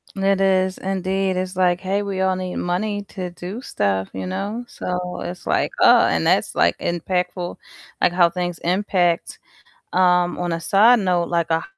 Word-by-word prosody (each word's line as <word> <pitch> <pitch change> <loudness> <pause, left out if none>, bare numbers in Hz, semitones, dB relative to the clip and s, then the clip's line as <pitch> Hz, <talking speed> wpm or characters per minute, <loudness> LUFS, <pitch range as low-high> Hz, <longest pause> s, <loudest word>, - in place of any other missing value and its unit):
It 195 0 +1
is, 190 -1 +2
indeed, 190 0 -1
it's 185 0 -3
like, 180 -1 +2
"Hey, 195 +2 -1
we 195 -2 -4
all 190 0 +2
need 185 0 -4
money 205 +4 -2
to 185 -2 -5
do 180 +6 -7
stuff," 95 - -1
you 95 0 -5
know? 210 - -4
So, 180 -4 -4
it's 175 0 -7
like, - - +1
"Oh" - - +7
and - - 0
that's - - +2
like 85 - +2
impactful, 180 +1 -2 0.5
like - - +4
how 175 -1 +4
things 175 -1 -4
impact. 180 -1 0 0.5
Um, 180 -1 +3
on 175 -1 -2
a 165 - -2
side 215 +8 +5
note, 180 -3 +1
like 170 -1 0
a 160 - +4
h - - -6
180 Hz, 180 wpm, -21 LUFS, 175-195 Hz, 0.5 s, Oh